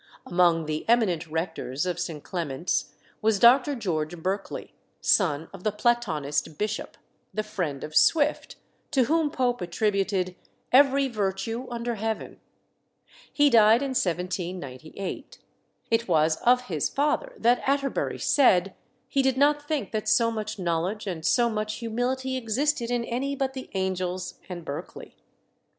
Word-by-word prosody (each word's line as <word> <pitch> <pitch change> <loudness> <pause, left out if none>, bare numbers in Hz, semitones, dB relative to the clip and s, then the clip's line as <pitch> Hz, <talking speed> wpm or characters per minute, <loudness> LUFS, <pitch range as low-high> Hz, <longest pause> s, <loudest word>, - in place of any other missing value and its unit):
Among 175 -2 +3
the 155 0 -3
eminent 190 -9 +2
rectors 160 -3 -3
of 180 -1 -2
St. 160 -4 -4
Clement's 165 -2 -2 0.3
was 220 -1 +3
Dr. 255 +6 +5
George 175 -7 -2
Berkeley, 190 +4 -4 0.3
son 160 -5 +2
of 190 -2 -11
the 215 - +1
Platonist 165 -10 0
bishop, 210 0 -3 0.3
the 215 - -2
friend 180 -10 -4
of 155 - -7
Swift, 300 - +3 0.3
to 270 -4 +3
whom 315 +4 +2
Pope 250 -5 0
attributed 190 0 0 0.4
"every 275 +1 +5
virtue 225 +2 -2
under 240 0 -3
heaven." 220 0 -4 0.9
He 290 -1 +4
died 225 +2 +6
in 275 - -2
1798. 180 - -4 0.5
It 230 +1 +2
was 160 -2 +3
of 250 +1 +4
his 165 - -2
father 300 - 0
that 240 - +3
Atterbury 275 0 0
said, 195 -9 +3 0.3
he 275 - +1
did 265 -1 +1
not 290 +1 +3
think 290 -10 -2
that 215 -1 -2
so 230 -1 +4
much 215 -1 -4
knowledge 180 +4 -1
and 175 -5 -4
so 240 +7 +3
much 215 -1 -2
humility 250 +3 -2
existed 250 +2 0
in 240 -1 0
any 270 +4 -2
but 270 -1 -1
the 260 -1 -7
angels 185 -1 -2
and 175 -2 -7
Berkeley. 140 -3 -7
215 Hz, 140 wpm, -26 LUFS, 175-250 Hz, 0.9 s, died